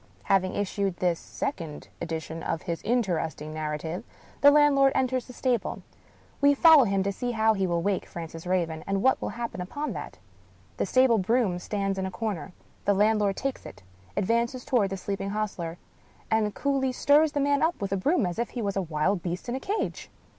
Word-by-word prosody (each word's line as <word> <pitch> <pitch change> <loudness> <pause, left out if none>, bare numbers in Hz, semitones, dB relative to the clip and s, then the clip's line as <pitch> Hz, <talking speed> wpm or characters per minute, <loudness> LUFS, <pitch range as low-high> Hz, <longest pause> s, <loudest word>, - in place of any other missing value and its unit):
Having 185 - +2
issued 200 -2 -1
this 175 -2 +1
second 165 - -5
edition 160 0 -4
of 165 - -3
his 170 -3 -3
interesting 175 -9 -1
nar 155 -1 -2
rative, 165 +5 -5 0.4
the 285 - +9
landlord 285 -2 +5
enters 255 -1 0
the - - -9
stable. 245 -3 -1 0.6
We 285 0 +5
follow 315 -3 +8
him 195 -2 +1
to 200 - 0
see 245 +4 -3
how 220 0 +3
he 195 -2 0
will 170 -1 0
wake 200 -2 0
Francis 165 0 -8
Raven, 165 -4 -1
and 195 0 0
what 265 - +3
will - - -2
happen 235 -6 -4
upon 285 +12 -4
that. - - -7 0.6
The - - 0
stable 255 -3 +4
broom 200 -2 +1
stands 195 0 -2
in 190 - -1
a - - -3
corner; 190 -3 -4 0.3
the 200 - +3
land 215 +2 +3
lord 200 -2 +1
takes 270 -1 -3
it 95 0 -11 0.2
— 90 +1 -28
^advances 235 +4 0
toward 240 -8 +2
the 195 - -4
sleeping 195 +1 -3
hostler 200 -5 -3 0.3
— - - -30
and 215 -2 +1
coolly 275 -2 0
stirs 290 +4 +4
the 290 - 0
man 285 0 +2
up 320 +2 +1
with 200 -1 -3
a 195 - +1
broom 285 - +2
as 175 +4 -3
if 235 - -1
he 245 - -5
was 200 -1 -1
a 195 - +1
wild 170 +3 0
beast 175 +6 -4
in - - -1
a 260 - -2
cage. 405 +9 -3
200 Hz, 205 wpm, -27 LUFS, 180-255 Hz, 0.6 s, the